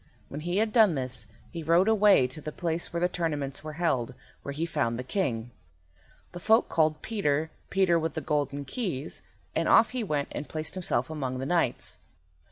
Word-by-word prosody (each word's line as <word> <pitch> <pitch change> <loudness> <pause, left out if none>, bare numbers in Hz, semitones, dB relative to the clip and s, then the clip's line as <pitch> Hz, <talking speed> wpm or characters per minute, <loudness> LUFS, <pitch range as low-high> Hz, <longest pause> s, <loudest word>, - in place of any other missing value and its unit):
When 145 - -6
he 175 +3 -1
had 215 0 +1
done 215 -8 +6
this 130 -5 -3 0.2
he 170 - -5
rode 170 +5 +4
away 210 -10 +5
to 130 +5 -6
the 155 - -5
place 170 +1 -2
where 170 - -2
the 175 - +3
tournaments 150 -6 -3
were 155 0 -6
held, 135 -7 0 0.3
where 140 - -5
he 155 +4 -2
found 120 -8 -1
the 125 - -4
King. 125 - -2 0.8
The 175 - -7
folk 220 +5 +4
called 155 -1 +1
Peter, 160 -8 0 0.2
Peter 185 -3 +3
with 160 0 -2
the 160 - -2
Golden 145 -1 -1
Keys, 165 - -3 0.3
and - - +1
off 225 - +6
he 250 -2 -2
went 150 -7 -1
and 145 - -5
placed 155 0 -4
himself 160 -7 +1
among 130 -5 -3
the 130 - -3
knights. 170 -5 0
155 Hz, 190 wpm, -28 LUFS, 140-180 Hz, 0.8 s, done